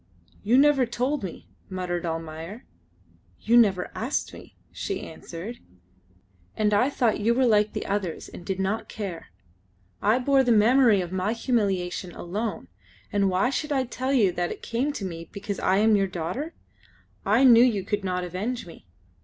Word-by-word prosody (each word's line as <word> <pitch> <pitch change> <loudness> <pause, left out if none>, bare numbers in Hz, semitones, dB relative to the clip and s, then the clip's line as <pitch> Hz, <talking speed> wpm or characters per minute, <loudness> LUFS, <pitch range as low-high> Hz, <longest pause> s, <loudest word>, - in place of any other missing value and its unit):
"You 230 +5 +3
never 275 -3 +5
told 250 +3 -1
me," 185 - -7 0.2
muttered 180 -2 -3
Almayer. 165 +6 -6 0.7
"You 230 - +2
never 200 -6 +4
asked 250 +6 -2
me," - - -13
she 395 - -4
answered, 175 +8 -8 1.0
"and 210 -1 +2
I 225 +7 +3
thought 240 -6 +1
you 230 +3 +2
were 260 +1 +3
like 210 -2 +3
the - - -4
others 195 -5 -3
and - - -11
did 190 +1 -3
not 195 +4 -2
care. 195 -6 -6 0.7
I 215 +4 +3
bore 270 +1 +3
the 245 - +2
memory 225 -1 +5
of 175 -1 -5
my 190 +3 0
humiliation 195 -7 -1
alone, 205 - -4 0.5
and 200 -1 +2
why 190 +7 +1
should 300 +2 -3
I 270 -2 +2
tell 255 +2 -3
you 220 -9 +4
that 175 0 -2
it - - -8
came 250 +6 -1
to 200 - -5
me 165 -2 -7
because 200 0 -5
I 190 - +2
am 215 +1 +4
your 195 -1 +2
daughter? 185 - -4 0.7
I 215 +6 +3
knew 240 -2 +8
you 220 -6 +2
could 205 +1 -2
not 180 -1 -1
avenge 205 +8 -3
me." 165 - -14
210 Hz, 170 wpm, -26 LUFS, 185-245 Hz, 1.0 s, knew